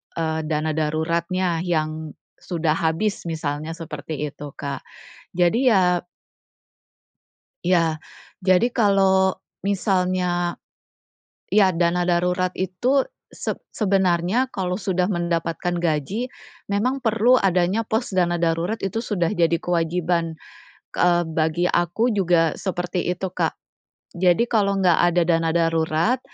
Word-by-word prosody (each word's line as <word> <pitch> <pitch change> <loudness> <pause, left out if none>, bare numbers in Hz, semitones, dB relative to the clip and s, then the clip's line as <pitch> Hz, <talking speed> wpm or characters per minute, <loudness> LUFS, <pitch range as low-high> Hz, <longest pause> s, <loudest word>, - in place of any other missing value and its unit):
eee, 160 -1 -1
dana 155 0 0
daruratnya 165 +3 -1
yang 155 -2 -2 0.2
sudah 165 -3 -1
habis, 170 +4 -1
misalnya 155 0 -3
seperti 155 -2 -6
itu, 145 0 -9
Kak. 140 -1 -4 0.6
Jadi 180 +6 +3
ya 180 -4 +3 1.7
Ya, 165 -3 +2 0.4
jadi 185 +5 +4
kalau 195 -5 +3 0.3
misalnya 180 -3 0 0.9
iya, 195 -3 +4
dana 175 +1 +1
darurat 180 +1 +1
itu 240 +9 +1 0.3
seb - - -4 0.2
sebenarnya 195 +4 +1
kalau 180 -3 -2
sudah 185 -2 0
mendapatkan 170 -2 -1
gaji, 170 - -1 0.4
memang 240 +7 0
perlu 230 +2 +3
adanya 185 +2 +2
pos 220 -1 -1
dana 175 -2 +2
darurat, 170 +4 0
itu 195 +4 -2
sudah 195 -7 -1
jadi 170 -4 +2
kewajiban. 170 -1 -1 0.6
Ke - - -7
eee, 175 -1 +4
bagi 160 +2 0
aku 175 +8 +1
juga 175 -5 +2
seperti 180 -1 -3
itu, 180 +2 -2
Kak. - - -1 0.6
Jadi 180 +5 +3
kalau 205 -4 +1
nggak 180 -4 +3
ada 175 - +3
dana 165 -1 +2
darurat, 165 +6 +1
175 Hz, 115 wpm, -22 LUFS, 165-195 Hz, 1.7 s, jadi